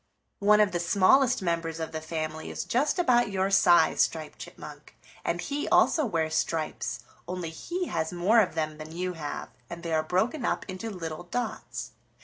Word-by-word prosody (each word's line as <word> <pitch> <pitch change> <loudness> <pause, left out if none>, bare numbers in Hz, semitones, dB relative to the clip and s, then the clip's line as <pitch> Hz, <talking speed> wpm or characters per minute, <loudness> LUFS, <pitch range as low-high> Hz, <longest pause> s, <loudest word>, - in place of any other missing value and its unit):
One 210 +1 +5
of 210 -2 +4
the 175 - -1
smallest 200 +8 +4
members 165 -2 -1
of 160 - -4
the 160 - -4
family 155 0 -4
is - - -4
just 285 +8 +1
about 245 - +3
your 195 0 0
size, 175 -3 +5
Striped - - -1
Chipmunk, - - -11 0.3
and - - -1
he 290 +1 -3
also 310 -5 +4
wears 160 -5 -1
stripes, 160 -1 -2 0.3
only 180 -2 -4
he 355 - -4
has 160 - -2
more 185 +6 +3
of 200 -6 +2
them 155 -1 -2
than 155 +1 -8
you 180 0 -2
have, 150 -4 -5 0.2
and 170 0 -8
they 165 -1 -2
are 155 - +3
broken 190 - 0
up - - -1
into 190 +4 -5
little 170 -4 -6
dots. 245 +8 -4
180 Hz, 180 wpm, -28 LUFS, 160-215 Hz, 0.3 s, One